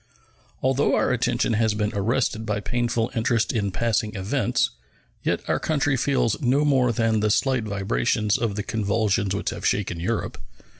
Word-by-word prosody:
Although 135 Hz, +2 st, +2 dB
our -, -, +1 dB
attention -, -, +1 dB
has 110 Hz, -1 st, +1 dB
been 105 Hz, 0 st, -1 dB
arrested 110 Hz, +2 st, 0 dB
by 105 Hz, -1 st, -2 dB
painful 120 Hz, +1 st, -1 dB
interest 115 Hz, 0 st, +1 dB
in 105 Hz, -4 st, 0 dB
passing 110 Hz, +2 st, -1 dB
events, 125 Hz, +6 st, 0 dB, 0.5 s
yet -, -, -2 dB
our -, -, +1 dB
country 145 Hz, -3 st, +1 dB
feels 130 Hz, -2 st, 0 dB
no 140 Hz, +3 st, +2 dB
more 130 Hz, -4 st, +3 dB
than 115 Hz, -1 st, +1 dB
the 105 Hz, 0 st, +1 dB
slight 130 Hz, +1 st, +1 dB
vibrations 105 Hz, +1 st, 0 dB
of 115 Hz, -4 st, -1 dB
the 105 Hz, -, -2 dB
convulsions 100 Hz, -2 st, 0 dB
which 100 Hz, -, -2 dB
have -, -, -7 dB
shaken 95 Hz, -4 st, 0 dB
Europe. 105 Hz, +7 st, -3 dB
115 Hz, 160 wpm, -24 LUFS, 105-125 Hz, 0.5 s, more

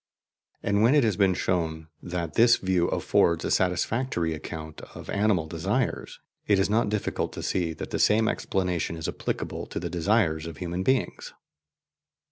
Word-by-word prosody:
And 100 Hz, +1 st, +1 dB
when 120 Hz, +6 st, +5 dB
it 145 Hz, -, +5 dB
has 110 Hz, -3 st, +2 dB
been 95 Hz, -3 st, +3 dB
shown 80 Hz, -4 st, -1 dB
that 85 Hz, -3 st, -4 dB
this 120 Hz, +5 st, +6 dB
view 95 Hz, -2 st, +1 dB
affords 85 Hz, -1 st, +2 dB
a -, -, -1 dB
satisfactory 90 Hz, 0 st, 0 dB
account 80 Hz, 0 st, -7 dB
of -, -, -8 dB
animal 100 Hz, -5 st, +2 dB
desires, 95 Hz, +10 st, -2 dB, 0.3 s
it 100 Hz, -, +4 dB
is 95 Hz, +1 st, +1 dB
not 110 Hz, -1 st, +2 dB
difficult 105 Hz, -1 st, -2 dB
to -, -, -6 dB
see 85 Hz, -3 st, -1 dB
that -, -, -7 dB
the -, -, -2 dB
same 110 Hz, +1 st, +4 dB
explanation 90 Hz, -3 st, -1 dB
is 80 Hz, -, -4 dB
applicable -, -, -4 dB
to -, -, -4 dB
the -, -, -5 dB
desires 85 Hz, -3 st, +1 dB
of 80 Hz, -, -8 dB
human 90 Hz, 0 st, -3 dB
beings. 130 Hz, +6 st, -1 dB
90 Hz, 165 wpm, -26 LUFS, 85-105 Hz, 0.3 s, this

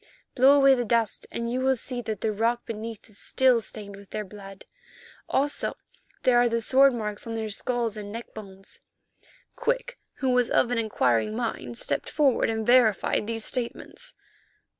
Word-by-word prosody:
Blow 270 Hz, +2 st, +6 dB
away 275 Hz, -1 st, +6 dB
the 245 Hz, -2 st, +1 dB
dust, 230 Hz, -2 st, 0 dB
and 235 Hz, 0 st, -3 dB
you 255 Hz, -, -1 dB
will 265 Hz, 0 st, +3 dB
see 245 Hz, 0 st, -4 dB
that 215 Hz, -3 st, -5 dB
the 220 Hz, -, 0 dB
rock 230 Hz, +3 st, 0 dB
beneath 225 Hz, -1 st, -7 dB
is 210 Hz, -3 st, -13 dB
still 255 Hz, -3 st, +3 dB
stained 205 Hz, -2 st, -8 dB
with 200 Hz, 0 st, -14 dB
their 215 Hz, -, -4 dB
blood; 195 Hz, -1 st, -12 dB, 0.6 s
also, 285 Hz, +2 st, 0 dB, 0.5 s
there 250 Hz, -1 st, +4 dB
are 240 Hz, 0 st, +4 dB
the 230 Hz, 0 st, 0 dB
sword 270 Hz, +4 st, +5 dB
marks 210 Hz, -1 st, -4 dB
on 225 Hz, -, -4 dB
their 220 Hz, -1 st, -3 dB
skulls, 235 Hz, 0 st, -1 dB
and 205 Hz, -1 st, -7 dB
neckbones." 200 Hz, -4 st, -9 dB, 0.8 s
Quick, -, -, -2 dB, 0.2 s
who 265 Hz, -2 st, -1 dB
was 250 Hz, -1 st, +3 dB
of 245 Hz, -, +2 dB
an 245 Hz, -, +1 dB
inquiring 210 Hz, -, +1 dB
mind, 235 Hz, 0 st, -4 dB
stepped -, -, -2 dB
forward 275 Hz, -7 st, +2 dB
and 220 Hz, -1 st, -2 dB
verified 225 Hz, -4 st, +3 dB
these 225 Hz, -1 st, -2 dB
statements. 275 Hz, -, -3 dB
230 Hz, 170 wpm, -26 LUFS, 215-255 Hz, 0.8 s, Blow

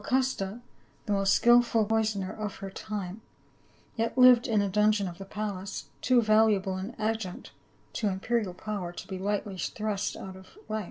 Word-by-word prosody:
custa, 250 Hz, -5 st, 0 dB, 0.5 s
the 210 Hz, -, 0 dB
most 195 Hz, -1 st, +2 dB
skilful 240 Hz, -2 st, +5 dB
poisoner 215 Hz, -3 st, 0 dB
of 210 Hz, -2 st, -5 dB
her 195 Hz, -1 st, -7 dB
time, 205 Hz, 0 st, -5 dB, 0.7 s
yet 230 Hz, +2 st, -2 dB
lived 250 Hz, 0 st, +7 dB
in 220 Hz, -3 st, +2 dB
a 200 Hz, -, +1 dB
dungeon 210 Hz, 0 st, +2 dB
of 175 Hz, 0 st, -8 dB
the 195 Hz, -, -7 dB
palace 200 Hz, -1 st, -5 dB
— -, -, -35 dB
too 250 Hz, -2 st, +4 dB
valuable 215 Hz, -3 st, +3 dB
an 195 Hz, +6 st, -5 dB
adjunct 215 Hz, -4 st, -3 dB, 0.4 s
to 215 Hz, -, -1 dB
imperial 200 Hz, 0 st, -1 dB
power 200 Hz, -3 st, -4 dB
to 175 Hz, -, -9 dB
be 190 Hz, -3 st, -5 dB
lightly 200 Hz, -1 st, -2 dB
thrust 210 Hz, +2 st, -2 dB
out 190 Hz, -1 st, -8 dB
of 190 Hz, -, -15 dB
life. 220 Hz, -, -2 dB
210 Hz, 170 wpm, -28 LUFS, 195-225 Hz, 0.7 s, lived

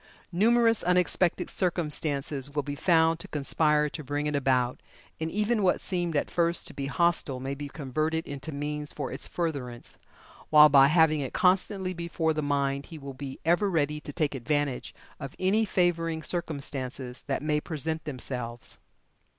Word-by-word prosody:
Numerous 230 Hz, +4 st, +4 dB
unexpected 180 Hz, 0 st, +2 dB
circumstances 150 Hz, -5 st, -1 dB
will 145 Hz, -, 0 dB
be 145 Hz, +1 st, -4 dB
found 160 Hz, +1 st, +3 dB
to -, -, -6 dB
conspire 150 Hz, +1 st, +2 dB
to 150 Hz, +1 st, -7 dB
bring 145 Hz, +2 st, -2 dB
it 150 Hz, 0 st, -1 dB
about, 130 Hz, -3 st, +1 dB, 0.4 s
and 160 Hz, 0 st, -2 dB
even 210 Hz, +4 st, 0 dB
what 185 Hz, -2 st, +3 dB
seemed 175 Hz, -4 st, -1 dB
at -, -, -1 dB
first 170 Hz, 0 st, +2 dB
to -, -, -6 dB
be 140 Hz, -1 st, -4 dB
hostile 165 Hz, -3 st, +1 dB
may 135 Hz, +2 st, -3 dB
be 145 Hz, +1 st, -6 dB
converted 155 Hz, +3 st, -2 dB
into 145 Hz, +2 st, -6 dB
means 150 Hz, +1 st, -4 dB
for 140 Hz, -3 st, -5 dB
its -, -, -3 dB
furtherance; 140 Hz, -8 st, -4 dB, 0.5 s
while 150 Hz, 0 st, +8 dB
by 135 Hz, -1 st, +7 dB
having 155 Hz, 0 st, +4 dB
it 135 Hz, -3 st, -4 dB
constantly 185 Hz, 0 st, +2 dB
before 170 Hz, -2 st, -1 dB
the 155 Hz, -, -2 dB
mind 140 Hz, -1 st, -1 dB
he 165 Hz, -, -9 dB
will 140 Hz, -2 st, -8 dB
be 135 Hz, 0 st, -7 dB
ever 175 Hz, +5 st, +3 dB
ready 150 Hz, -3 st, 0 dB
to 150 Hz, -, -8 dB
take 145 Hz, 0 st, -1 dB
advantage 140 Hz, +1 st, -2 dB, 0.2 s
of 135 Hz, -, -7 dB
any 205 Hz, +4 st, +2 dB
favoring 165 Hz, -4 st, 0 dB
circumstances 135 Hz, -7 st, -4 dB
that 140 Hz, 0 st, -1 dB
may 150 Hz, 0 st, +1 dB
present 160 Hz, 0 st, -3 dB
themselves." 125 Hz, -4 st, -5 dB
150 Hz, 165 wpm, -28 LUFS, 140-170 Hz, 0.5 s, while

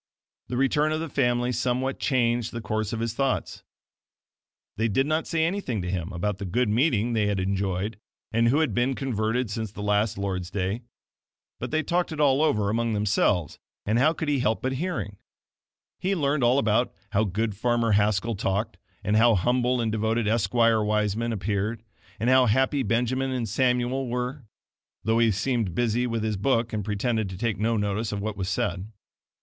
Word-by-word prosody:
The 125 Hz, -, -3 dB
return 145 Hz, +3 st, +2 dB
of 155 Hz, -, 0 dB
the 165 Hz, -, -3 dB
family 120 Hz, -2 st, +1 dB
somewhat 125 Hz, +2 st, -1 dB
changed 120 Hz, -4 st, +1 dB
the 115 Hz, -, -3 dB
course 110 Hz, -1 st, -2 dB
of 115 Hz, -1 st, -3 dB
his 115 Hz, -1 st, -1 dB
thoughts. 135 Hz, +1 st, -1 dB, 1.1 s
They 110 Hz, +2 st, +1 dB
did 135 Hz, +5 st, +1 dB
not 155 Hz, +2 st, 0 dB
say 160 Hz, -1 st, +1 dB
any 195 Hz, +5 st, -1 dB
thing 120 Hz, -, -3 dB
to 90 Hz, -, -3 dB
him 90 Hz, -3 st, -3 dB
about 95 Hz, +3 st, -2 dB
the 100 Hz, -, -4 dB
good 110 Hz, +6 st, 0 dB
meeting 120 Hz, -1 st, +2 dB
they 105 Hz, -2 st, +1 dB
had 100 Hz, -2 st, 0 dB
enjoyed, 95 Hz, +2 st, -2 dB, 0.3 s
and 115 Hz, +1 st, +3 dB
who 140 Hz, +6 st, +3 dB
had 155 Hz, -, 0 dB
been 125 Hz, +2 st, +1 dB
converted 115 Hz, -2 st, -1 dB
since 110 Hz, -1 st, -3 dB
the 105 Hz, -, -7 dB
last 105 Hz, 0 st, +1 dB
Lord's 95 Hz, -2 st, -3 dB
day; 100 Hz, +3 st, -2 dB, 0.8 s
but -, -, -4 dB
they 155 Hz, +1 st, 0 dB
talked 175 Hz, +3 st, 0 dB
it 155 Hz, -, -5 dB
all 140 Hz, -1 st, +4 dB
over 105 Hz, -10 st, +2 dB
among 115 Hz, 0 st, 0 dB
themselves, 100 Hz, -6 st, +1 dB, 0.3 s
and 110 Hz, +3 st, +2 dB
how 150 Hz, +5 st, +5 dB
could 160 Hz, -1 st, -4 dB
he 145 Hz, -2 st, +1 dB
help 125 Hz, 0 st, 0 dB
hearing? 130 Hz, -, -3 dB, 0.8 s
He 195 Hz, +2 st, 0 dB
learned 145 Hz, -4 st, +1 dB
all 120 Hz, +2 st, +4 dB
about 110 Hz, -1 st, +2 dB, 0.2 s
"how 105 Hz, +1 st, +2 dB
good 105 Hz, +1 st, -1 dB
farmer 120 Hz, +1 st, +1 dB
Haskell 105 Hz, +2 st, +2 dB
talked," 100 Hz, 0 st, -2 dB, 0.2 s
and 105 Hz, +1 st, +2 dB
"how 115 Hz, 0 st, +5 dB
humble 125 Hz, +5 st, +1 dB
and 115 Hz, -2 st, 0 dB
devoted 110 Hz, +1 st, 0 dB
Esquire 115 Hz, +1 st, +3 dB
Wiseman 105 Hz, +2 st, 0 dB
appeared," 105 Hz, +1 st, -2 dB, 0.4 s
and 115 Hz, -, -1 dB
"how 130 Hz, 0 st, +5 dB
happy 130 Hz, +5 st, +2 dB
Benjamin 125 Hz, +3 st, 0 dB
and 125 Hz, -3 st, -2 dB
Samuel 125 Hz, +3 st, +1 dB
were"; 125 Hz, +2 st, -3 dB, 0.6 s
though 110 Hz, +2 st, +2 dB
he 115 Hz, -1 st, +4 dB
seemed 110 Hz, -2 st, -1 dB
busy 120 Hz, +2 st, +1 dB
with 115 Hz, -2 st, -2 dB
his 110 Hz, -2 st, -1 dB
book 115 Hz, +2 st, +1 dB
and 105 Hz, -1 st, -1 dB
pretended 110 Hz, +1 st, -1 dB
to 95 Hz, -, -7 dB
take 110 Hz, -2 st, -1 dB
no 115 Hz, +1 st, +1 dB
notice 105 Hz, +2 st, -1 dB
of 105 Hz, -, -3 dB
what 105 Hz, +1 st, -3 dB
was 95 Hz, -2 st, -3 dB
said. 95 Hz, +3 st, -2 dB
115 Hz, 190 wpm, -26 LUFS, 105-125 Hz, 1.1 s, how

